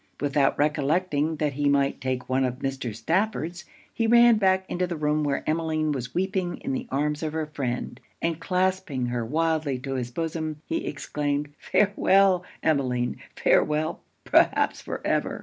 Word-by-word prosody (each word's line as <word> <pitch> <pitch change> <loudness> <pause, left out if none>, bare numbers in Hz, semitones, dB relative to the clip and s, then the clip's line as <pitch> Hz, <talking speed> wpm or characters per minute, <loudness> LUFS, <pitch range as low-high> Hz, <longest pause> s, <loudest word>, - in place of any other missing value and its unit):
Without 140 -1 +2
recollecting 150 +1 +1
that 150 -1 -1
he 145 +1 +1
might 140 -1 +1
take 130 -1 -2
one 130 +1 +1
of 125 -1 0
Mr. 130 -4 -4
Stafford's, 175 - -1 0.3
he 230 - 0
ran 235 0 +7
back 190 -2 +2
into 180 +1 -1
the 175 - -3
room 150 0 0
where 140 -2 -1
Emmeline 155 -1 0
was 125 -3 -4
weeping 185 -1 -1
in 270 - -4
the 255 -1 -3
arms 150 +2 -1
of 155 -1 -3
her 160 -1 -1
friend, 135 -5 -4 0.2
and 165 -1 -1
clasping 185 -8 0
her 120 -1 -2
wildly 155 +1 0
to 135 +2 -5
his 125 -2 -2
bosom, 155 +2 -3
he 165 - -2
exclaimed 145 0 -2
'Farewell, 195 -2 +3 0.2
Emmeline! 130 -5 +1 0.2
Farewell, 155 +1 +2 0.3
perhaps, - - +3
for - - -6
ever! - - 0
150 Hz, 160 wpm, -26 LUFS, 135-175 Hz, 0.3 s, ran